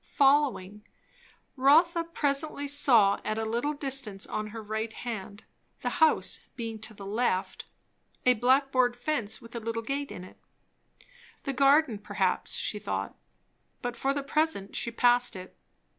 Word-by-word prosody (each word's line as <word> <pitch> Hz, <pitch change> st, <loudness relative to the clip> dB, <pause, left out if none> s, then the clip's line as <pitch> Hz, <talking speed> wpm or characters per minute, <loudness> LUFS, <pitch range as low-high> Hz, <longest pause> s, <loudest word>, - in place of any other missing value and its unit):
Following 270 Hz, -8 st, +2 dB, 0.7 s
011, 260 Hz, -, -9 dB
Rotha 335 Hz, +5 st, +5 dB
presently 285 Hz, -2 st, -1 dB
saw 240 Hz, -8 st, +4 dB
at 215 Hz, -, -2 dB
a 225 Hz, -, -1 dB
little 235 Hz, +7 st, -1 dB
distance 265 Hz, -8 st, -3 dB
on 215 Hz, 0 st, -4 dB
her 220 Hz, +1 st, -8 dB
right 220 Hz, +1 st, -3 dB
hand, 215 Hz, -3 st, -7 dB, 0.4 s
the -, -, 0 dB
house 315 Hz, -, +3 dB, 0.2 s
being 225 Hz, -2 st, -5 dB
to 220 Hz, 0 st, -6 dB
the 200 Hz, -, -10 dB
left, 205 Hz, -2 st, -1 dB, 0.6 s
a 250 Hz, -, +6 dB
black 260 Hz, +4 st, +2 dB
board 250 Hz, -2 st, +2 dB
fence 245 Hz, -5 st, -1 dB
with 230 Hz, -, -13 dB
a -, -, -2 dB
little 230 Hz, 0 st, -4 dB
gate 280 Hz, +4 st, -3 dB
in 180 Hz, -, -8 dB
it. 185 Hz, -, -14 dB, 1.0 s
The 275 Hz, -, -3 dB
garden 275 Hz, -3 st, +4 dB
perhaps, 205 Hz, -, -1 dB
she -, -, -1 dB
thought; -, -, -4 dB, 0.7 s
but 245 Hz, 0 st, -3 dB
for 270 Hz, -, 0 dB
the 280 Hz, 0 st, -2 dB
present 290 Hz, -8 st, 0 dB
she -, -, -2 dB
passed 245 Hz, 0 st, +3 dB
it. 185 Hz, 0 st, -10 dB
245 Hz, 155 wpm, -28 LUFS, 215-280 Hz, 1.0 s, a